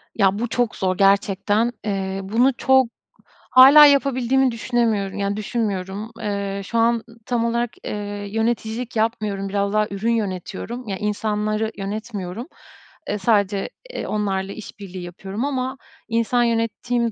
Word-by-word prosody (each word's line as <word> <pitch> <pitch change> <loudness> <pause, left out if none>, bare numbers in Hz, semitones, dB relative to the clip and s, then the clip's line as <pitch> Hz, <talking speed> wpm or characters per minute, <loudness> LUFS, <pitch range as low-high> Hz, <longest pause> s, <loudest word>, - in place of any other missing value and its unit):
Ya, 200 -1 +3
bu 240 - -1
çok 240 -1 0
zor 185 -1 -1
gerçekten. 200 +3 +2
Eee, 195 -2 -2
bunu 235 +7 +3
çok 265 -1 +4 0.6
hâlâ 275 +4 +10
yapabildiğimi 265 -2 +3
düşünemiyorum, 225 -4 0
yani, 200 0 -1
düşünmüyorum. 210 -1 -3
Eee, 200 -1 -3
şu 230 - -3
an 230 0 +3 0.2
tam 235 -2 0
olarak, 235 +1 0 0.2
eee, 205 -1 -4
yöneticilik 225 +2 -2
yapmıyorum. 215 -3 -1
Biraz 200 0 -1
daha 215 0 +2
ürün 205 +4 -1
yönetiyorum, 225 +3 -3
yani, 195 -2 -3
insanları 215 +1 -1
yönetmiyorum. 205 +1 -5 0.6
Iıı, 210 - -1
sadece, 200 -2 +1 0.3
ııı, - - -3
onlarla 195 -2 -1
işbirliği 195 -3 -9
yapıyorum. 190 +6 -5
Ama 260 -1 -2 0.3
insan 230 +1 +1
yönettiğim 235 +1 0
215 Hz, 130 wpm, -22 LUFS, 200-235 Hz, 0.6 s, hâlâ